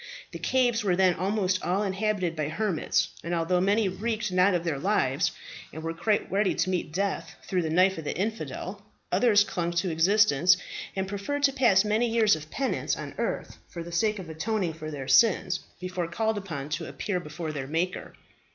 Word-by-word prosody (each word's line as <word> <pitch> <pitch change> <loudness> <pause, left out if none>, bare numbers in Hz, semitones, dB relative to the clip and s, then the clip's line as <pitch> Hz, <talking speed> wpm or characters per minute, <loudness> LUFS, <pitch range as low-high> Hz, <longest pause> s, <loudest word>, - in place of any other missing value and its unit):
The - - -7
caves 245 -4 +2
were 185 -3 +2
then 185 -1 +4
almost 190 +1 0
all 190 +4 0
inhabited 195 -3 -1
by 155 -2 -2
hermits, 175 0 0
and 170 +1 -2
although 175 +2 +1
many 205 +2 +2
recked 215 +2 -2
not 180 +1 +4
of 170 - -1
their 160 -5 -2
lives, - - +1 0.4
and 160 +2 -8
were 165 0 -2
quite 205 +5 0
ready 195 0 +2
to 185 +2 0
meet 180 -4 -2
death 195 +3 -2
through 185 -2 -1
the 160 - -2
knife 185 +2 +3
of 160 - -8
the - - -3
infidel, 215 +4 -4 0.3
others 210 -4 +5
clung 170 -4 -2
to 170 +1 0
existence, 180 0 +4 0.4
and 190 0 -1
preferred 205 +9 -3
to 275 -1 +4
pass 215 -7 +4
many 220 +3 +1
years 225 -4 +4
of 155 0 -9
penance 270 - -1
on - - -6
earth - - -3
for 170 - -6
the 170 - -9
sake 210 +5 +1
of 185 -3 -7
atoning 175 +2 -2
for 155 -1 -7
their 140 -3 -6
sins 185 -4 +4 0.2
before 180 -1 -3
called 220 +6 -1
upon 155 -8 -6
to 150 - -3
appear 190 -4 -2
before 155 0 -6
their 140 -3 -5
Maker. 165 +5 -2
185 Hz, 195 wpm, -27 LUFS, 165-210 Hz, 0.4 s, others